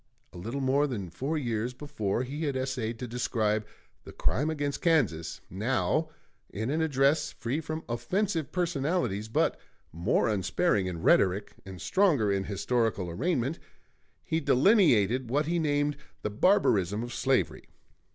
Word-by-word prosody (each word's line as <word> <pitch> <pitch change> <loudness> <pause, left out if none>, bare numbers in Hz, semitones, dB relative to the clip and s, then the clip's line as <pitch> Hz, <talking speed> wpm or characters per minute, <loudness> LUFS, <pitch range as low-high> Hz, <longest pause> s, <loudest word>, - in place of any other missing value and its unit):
A - - -10
little 115 +9 -4
more 135 +2 +2
than 100 - -5
four 145 - -2
years 120 -2 -2
before, 120 -6 -2
he 145 +5 -4
had 140 -2 -1
essayed 130 -3 -2
to 125 - -5
describe 110 -3 -1 0.4
"The - - -10
Crime 150 +4 0
against 145 -3 -2
Kansas"; 100 - +1
now, 130 - 0 0.4
in 110 +5 -3
an 160 +2 0
address 140 -1 +2
free 130 +7 -3
from 155 +1 -5
offensive 160 - -1
personalities 150 - -1
but 110 - +1 0.3
more 85 +5 +1
unsparing 105 - +1
in 85 -3 -5
rhetoric 100 +2 +3
and 95 -2 -8
stronger 150 - +2
in 95 -1 0
historical 105 -2 -1
arraignment, 135 - -1 0.6
he 160 - 0
delineated 130 - +4
what 145 +5 +1
he 170 +2 0
named 145 -2 +1 0.3
the 105 - -2
"Barbarism 105 - +2
of 120 0 -6
Slavery." 135 +1 0
125 Hz, 140 wpm, -29 LUFS, 105-150 Hz, 0.6 s, delineated